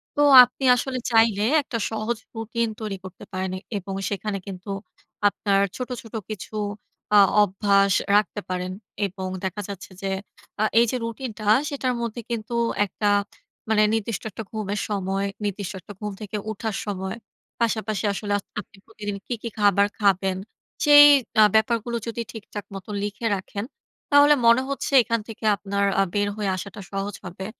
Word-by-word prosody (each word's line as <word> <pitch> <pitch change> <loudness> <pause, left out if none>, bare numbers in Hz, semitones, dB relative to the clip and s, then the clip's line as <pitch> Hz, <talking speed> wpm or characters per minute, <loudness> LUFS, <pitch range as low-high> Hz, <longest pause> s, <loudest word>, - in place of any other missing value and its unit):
তো 290 - +2 0.2
আপনি 250 +2 -5
আসলে 255 +1 -2
চাইলে 225 -3 +4 0.2
একটা 255 -4 -4
সহজ 220 +1 -2 0.2
রুটিন 225 +1 -1
তৈরি 210 -3 -3
করতে 185 -2 -10
পারেন 185 0 -3
এ - - -6 0.2
এবং 195 0 -6 0.2
সেখানে 200 0 -3
কিন্তু 190 +1 -8 0.6
আপনার 200 -1 +1 0.2
ছোট, 250 0 -4
ছোট 225 - -15 0.2
কিছু 215 +1 -7 0.6
আ - - +9 0.2
অভ্যাস 200 0 +3 0.2
রাখতে 205 0 +1
পারেন। 180 0 -2 0.4
এবং 190 0 -6 0.2
দেখা 190 +2 -3
যাচ্ছে 195 -1 -8
যে 195 - -2 0.5
আ - - +4 0.2
এই 235 - +6
যে - - -2
রুটিনটা, 230 -2 -6 0.2
সেটার 265 -4 -1
মধ্যে 235 0 -4
কিন্তু 230 0 -4 0.3
একটা 205 +2 -3 0.6
মানে 215 -1 +4
নির্দিষ্ট 225 -1 -2
একটা 225 - -6
ঘুমের 210 -2 -3
সময়, 195 -1 -1 0.2
নির্দিষ্ট 200 -1 -3
একটা 205 - -11
ঘুম 210 -1 -4
থেকে 210 0 -4
উঠার 220 0 -4
সময়। 190 0 -4 0.4
পাশাপাশি 220 -2 0
আসলে 205 +1 -4
আ - - -3 0.2
আপনি 205 - -21
প্রতিদিন 210 -2 -6
কী - - -2
কী 235 - -4
খাবার 200 -1 +4
খাবেন? 195 -2 +2 0.5
সেই 290 0 +10 0.4
আ - - +9
ব্যাপারগুলো 230 +1 +2
যদি 230 0 -3
ঠিকঠাক 210 -2 -8
মত 190 -1 -8 0.2
লিখে 210 +3 -4
রাখেন, 200 +1 -5 0.5
তাহলে 285 +1 +7
মনে 235 +2 +6
হচ্ছে 275 0 -3
এখান 230 0 0
থেকে 225 -1 -10
আপনার 200 0 -2 0.2
আ - - +5
বের 205 0 +1
হয়ে 205 -2 -1
আসাটা 200 +2 -7
সহজ 195 0 -3
হবে। 185 +2 -7
210 Hz, 160 wpm, -24 LUFS, 195-230 Hz, 0.6 s, সেই